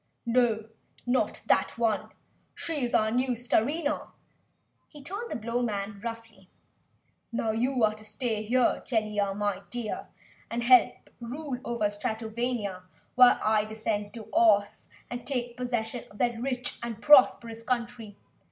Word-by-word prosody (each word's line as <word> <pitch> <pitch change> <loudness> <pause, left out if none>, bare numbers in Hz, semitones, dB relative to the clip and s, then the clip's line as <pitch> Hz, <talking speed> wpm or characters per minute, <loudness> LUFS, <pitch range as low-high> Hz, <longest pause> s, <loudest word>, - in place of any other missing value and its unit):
"No 235 +2 +4 0.2
No! - - -24 0.4
Not 250 +1 0
that - - +2
one! 225 -3 0 0.5
She 310 -5 -2
is 240 - 0
our 220 0 +3
new 250 +2 +1
Starina!" 285 +6 0 0.8
he 295 -2 -14
told 405 - -5
the - - -3
Blowman 215 -3 -2
roughly. 225 -5 -8 0.8
"Now 230 -1 0
you 245 +2 0
are 215 0 +4
to 215 0 -13
stay 215 +2 -2
right 215 - -4
here, 250 +1 +2
Jellia, 210 -4 0
my 205 -2 -1
dear, 240 -3 -4 0.4
and 235 +1 -2
help 245 -1 +5
rule 255 +2 -5
over 235 -3 -1
Stratovania 220 -1 -2 0.3
while 250 -1 +7
I 215 -1 +3
descend 215 -1 -3
to 225 -2 -8
Ohs 205 -3 +3 0.2
and 245 0 -4
take 245 -3 -3
possession 240 -1 -3
of 205 - -15
that 240 -1 0
rich 250 -1 -3
and 235 -2 -5
prosperous 235 -4 +5
country. 235 -3 -3
235 Hz, 145 wpm, -28 LUFS, 215-250 Hz, 0.8 s, while